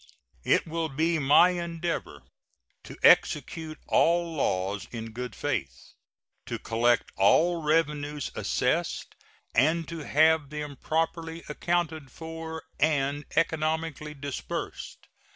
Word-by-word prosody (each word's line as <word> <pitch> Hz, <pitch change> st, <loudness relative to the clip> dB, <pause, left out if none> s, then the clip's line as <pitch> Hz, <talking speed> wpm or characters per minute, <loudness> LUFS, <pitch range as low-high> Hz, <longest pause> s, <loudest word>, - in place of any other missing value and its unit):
It -, -, +3 dB
will 165 Hz, 0 st, -2 dB
be 160 Hz, +4 st, +1 dB
my 145 Hz, +5 st, +6 dB
endeavor 170 Hz, -1 st, -4 dB, 0.6 s
to -, -, -10 dB
execute 160 Hz, -1 st, +3 dB
all 170 Hz, 0 st, +2 dB
laws 100 Hz, -7 st, -1 dB
in 115 Hz, -1 st, -6 dB
good 125 Hz, +2 st, -6 dB
faith, 70 Hz, -, -4 dB, 0.5 s
to -, -, -3 dB
collect 120 Hz, +1 st, +1 dB
all 165 Hz, -, +4 dB
revenues 150 Hz, -2 st, 0 dB
assessed, -, -, -1 dB, 0.4 s
and 160 Hz, +6 st, +2 dB
to 165 Hz, -1 st, -5 dB
have 155 Hz, 0 st, +3 dB
them 150 Hz, -1 st, -5 dB
properly 165 Hz, +2 st, -2 dB
accounted 160 Hz, -2 st, -1 dB
for 160 Hz, +2 st, -7 dB, 0.2 s
and 145 Hz, -1 st, +1 dB
economically 160 Hz, -2 st, -1 dB
disbursed. 140 Hz, -1 st, -6 dB
155 Hz, 105 wpm, -27 LUFS, 140-165 Hz, 0.6 s, my